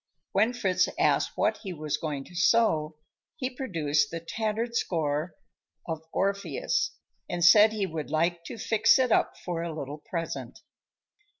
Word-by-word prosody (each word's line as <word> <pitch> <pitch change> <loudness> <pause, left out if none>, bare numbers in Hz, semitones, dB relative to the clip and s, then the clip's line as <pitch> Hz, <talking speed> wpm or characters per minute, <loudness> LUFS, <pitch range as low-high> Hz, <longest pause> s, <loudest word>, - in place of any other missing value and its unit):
When 215 +5 +2
Fritz 190 -7 +1
asked - - +2
what - - +2
he 190 -4 -6
was 155 -2 -2
going 145 -4 -4
to 180 - -16
sew, 170 -5 +2 0.4
he 265 -4 -3
produced 155 - 0
the 165 - -4
tattered 220 +7 -3
score 155 -4 -1 0.5
of 160 -2 -4
"Orpheus" 200 - -1 0.3
and 175 -1 +1
said 210 +5 +8
he 210 -2 -1
would 160 -4 -5
like 170 +2 0
to - - -7
fix 220 +3 +4
it 255 -2 +1
up - - +2
for 175 -2 -4
a 170 0 -3
little 150 -1 -6
present. 165 +2 -5
175 Hz, 155 wpm, -28 LUFS, 155-220 Hz, 0.5 s, said